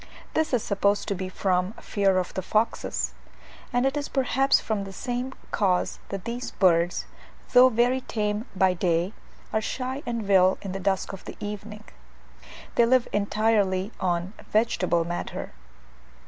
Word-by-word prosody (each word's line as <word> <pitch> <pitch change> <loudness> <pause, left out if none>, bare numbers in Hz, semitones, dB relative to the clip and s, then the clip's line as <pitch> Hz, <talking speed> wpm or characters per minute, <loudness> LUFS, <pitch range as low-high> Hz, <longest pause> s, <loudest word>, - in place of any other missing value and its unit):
This 315 0 +1
is 245 -4 +1
supposed 200 +1 +1
to - - +1
be 185 -1 -4
from 185 +1 0
fear 195 -4 +1
of 180 -1 -1
the 190 - -2
foxes: 215 +5 0 0.6
and 245 +1 +2
it 270 +1 +1
is 290 0 -3
perhaps 270 0 +3
from 215 -3 -2
the 195 - -7
same 245 +4 -3 0.2
cause 185 -4 +1
that 195 0 -5
these 240 +2 -4
birds, 175 -2 +2 0.5
though 255 +1 +8
very 245 +2 +2
tame 210 -1 -2
by 185 -1 +4
day, 175 +2 0 0.4
are 220 - +2
shy 260 +4 -3
and 230 -4 -2
wild 190 -1 +5
in 195 - -4
the 195 - -4
dusk 195 +1 0
of 195 - -8
the - - -8
evening. 210 +1 -6 0.9
They 235 - +4
live 255 0 +4
entirely 205 -2 +1
on 175 +1 -1 0.2
vegetable 185 -6 +2
matter. 175 +1 -4
205 Hz, 155 wpm, -26 LUFS, 185-235 Hz, 0.9 s, though